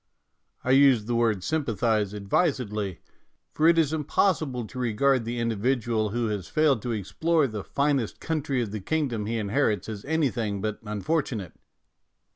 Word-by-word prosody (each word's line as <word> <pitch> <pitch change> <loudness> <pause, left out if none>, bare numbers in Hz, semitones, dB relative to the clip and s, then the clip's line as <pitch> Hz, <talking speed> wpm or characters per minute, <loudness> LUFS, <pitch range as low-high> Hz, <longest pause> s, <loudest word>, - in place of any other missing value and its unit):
I 130 - +1
use 135 -5 +5
the 120 - -2
word 115 -5 +1
sympathize 110 - 0
ad 100 -1 -7
visedly, 105 - 0 0.5
for 155 - +3
it 170 0 +5
is 160 -2 +2
impossible 150 - 0
to 125 - -8
regard 125 +1 +2
the 120 +1 -3
individual 115 -1 0
who 120 +3 -1
has 100 -5 -3
failed 150 -7 +2
to 120 - -3
explore 155 - +1
the 110 -6 -4
finest 140 -5 0
country 145 -6 -1
of 105 - -6
the 105 -1 -5
kingdom 125 -5 -1
he 115 +1 -1
inherits 105 -2 0
as 105 -3 -6
any 155 -3 +1
thing 105 -4 -2
but 105 +1 -3
unfortunate. 105 - -2
120 Hz, 160 wpm, -26 LUFS, 105-140 Hz, 0.5 s, use